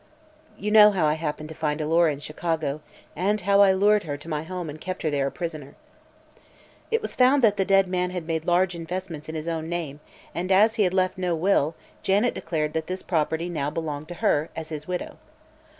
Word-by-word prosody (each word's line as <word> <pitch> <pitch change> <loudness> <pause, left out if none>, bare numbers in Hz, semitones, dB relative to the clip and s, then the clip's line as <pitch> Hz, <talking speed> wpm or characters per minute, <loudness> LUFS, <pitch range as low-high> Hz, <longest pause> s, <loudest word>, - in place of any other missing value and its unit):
"You 210 +1 -3
know 210 -1 +9
how 190 -6 +1
I 150 - +3
happened 155 -1 -4
to - - -7
find 150 -1 -2
Alora 165 +1 +3
in 140 - -5
Chicago 155 -1 -3 0.3
and 200 +5 +1
how 200 +2 +4
I 195 -1 +7
lured 205 +2 +4
her 145 -2 -4
to 150 - -13
my 155 -2 -2
home 180 +1 -5
and 155 +1 -8
kept 185 0 -5
her 155 - 0
there 140 -1 0
a - - -3
prisoner." 155 -5 -6 1.1
It 455 0 0
was - - -4
found 260 +2 +4
that 210 -3 +5
the 195 - 0
dead 195 -1 +4
man 180 0 -1
had 180 -2 -5
made 160 -1 -2
large 180 +1 +2
investments 170 -2 -6
in 160 - -5
his 155 +1 -5
own 165 -1 -3
name, 160 -5 -4 0.3
and 180 +2 -3
as 210 +4 +5
he 220 -2 +2
had 180 - 0
left 185 0 +1
no 180 -2 0
will 165 -3 +2 0.3
Janet 205 +5 +2
declared 155 -2 -2
that 160 -1 -2
this 185 +1 -4
property 160 0 0
now 150 -5 -2
belonged 155 -2 -4
to 175 - -7
her, 150 +2 +2
as 160 -1 -6
his 155 -1 -6
widow. 180 -1 -4
170 Hz, 220 wpm, -25 LUFS, 155-190 Hz, 1.1 s, know